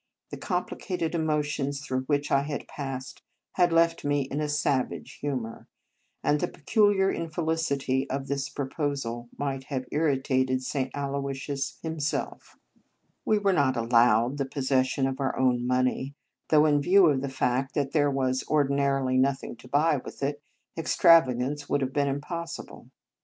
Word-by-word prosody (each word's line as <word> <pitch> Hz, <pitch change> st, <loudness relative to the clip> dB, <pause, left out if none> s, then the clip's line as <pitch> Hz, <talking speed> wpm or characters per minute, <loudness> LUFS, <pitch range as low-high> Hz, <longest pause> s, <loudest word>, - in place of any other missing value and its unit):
The -, -, -5 dB
complicated 180 Hz, -2 st, -3 dB
emotions 150 Hz, -3 st, -1 dB
through 130 Hz, -2 st, -3 dB
which 145 Hz, 0 st, 0 dB
I 140 Hz, -, +4 dB
had 145 Hz, 0 st, -5 dB
passed 135 Hz, -2 st, -6 dB, 0.3 s
had 175 Hz, -2 st, +2 dB
left 165 Hz, 0 st, +3 dB
me 145 Hz, 0 st, +1 dB
in 140 Hz, +3 st, -4 dB
a 150 Hz, -, -1 dB
savage 145 Hz, -3 st, -1 dB
humour; 130 Hz, -6 st, -4 dB, 0.6 s
and 150 Hz, -, +2 dB
the -, -, 0 dB
peculiar 195 Hz, +3 st, +2 dB
infelicity 160 Hz, -5 st, -1 dB
of 135 Hz, 0 st, -3 dB
this 140 Hz, 0 st, -2 dB
proposal 135 Hz, -4 st, -3 dB
might 135 Hz, -2 st, -3 dB
have 130 Hz, -3 st, -3 dB
irritated 130 Hz, -3 st, +1 dB
St. 130 Hz, 0 st, -2 dB
Aloysius 140 Hz, -1 st, -3 dB
him 160 Hz, -1 st, -4 dB
self. 150 Hz, +1 st, -3 dB, 0.7 s
We 215 Hz, -, +3 dB
were 200 Hz, -2 st, +2 dB
not 135 Hz, -6 st, +2 dB
allowed 120 Hz, +2 st, +3 dB
the 140 Hz, -, 0 dB
posses 130 Hz, -1 st, +1 dB
sion 135 Hz, +1 st, -1 dB
of 135 Hz, 0 st, -2 dB
our 135 Hz, -1 st, -1 dB
own 125 Hz, -2 st, +2 dB
money, 130 Hz, +2 st, 0 dB, 0.3 s
though 155 Hz, -1 st, +5 dB
in 145 Hz, -1 st, +3 dB
view 190 Hz, +5 st, +5 dB
of 145 Hz, -5 st, +3 dB
the 140 Hz, -, -3 dB
fact 130 Hz, 0 st, -1 dB
that 140 Hz, -3 st, 0 dB
there 145 Hz, -2 st, +3 dB
was 130 Hz, -1 st, 0 dB
ordinarily 140 Hz, -3 st, +1 dB
nothing 135 Hz, -1 st, 0 dB
to 130 Hz, -, -14 dB
buy 150 Hz, +3 st, +2 dB
with 135 Hz, -, -8 dB
it, 145 Hz, +1 st, -2 dB, 0.3 s
extravagance 145 Hz, -4 st, +3 dB
would 145 Hz, -, +1 dB
have 130 Hz, 0 st, -2 dB
been 145 Hz, -1 st, +1 dB
impossible. 155 Hz, +5 st, -5 dB
140 Hz, 155 wpm, -27 LUFS, 130-150 Hz, 0.7 s, though